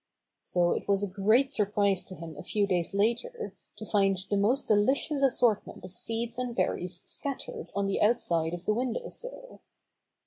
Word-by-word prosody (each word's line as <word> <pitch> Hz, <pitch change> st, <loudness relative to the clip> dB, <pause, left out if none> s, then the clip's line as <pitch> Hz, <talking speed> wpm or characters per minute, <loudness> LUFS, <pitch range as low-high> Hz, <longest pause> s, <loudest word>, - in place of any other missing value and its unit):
So 175 Hz, -1 st, +1 dB
it -, -, -2 dB
was 200 Hz, 0 st, +2 dB
a -, -, 0 dB
great 215 Hz, +8 st, +3 dB
surprise 200 Hz, -4 st, +2 dB
to 185 Hz, -, -9 dB
him 165 Hz, -2 st, -8 dB
a -, -, -8 dB
few 205 Hz, +3 st, +1 dB
days 180 Hz, -1 st, -1 dB
later 240 Hz, -, 0 dB, 0.2 s
to -, -, -8 dB
find 195 Hz, -2 st, +2 dB
the -, -, +3 dB
most 220 Hz, +8 st, +2 dB
delicious 265 Hz, +7 st, +2 dB
assortment 245 Hz, -9 st, +2 dB
of 185 Hz, -, -9 dB
seeds 230 Hz, +5 st, -3 dB
and 250 Hz, -2 st, -3 dB
berries 180 Hz, -5 st, -1 dB
scattered 450 Hz, -, -5 dB
on 200 Hz, 0 st, +1 dB
the 195 Hz, -, 0 dB
outside 170 Hz, -7 st, +2 dB
of 175 Hz, -, -11 dB
the 215 Hz, -, +2 dB
window 245 Hz, +1 st, -2 dB
sill. -, -, -9 dB
210 Hz, 175 wpm, -29 LUFS, 195-250 Hz, 0.2 s, great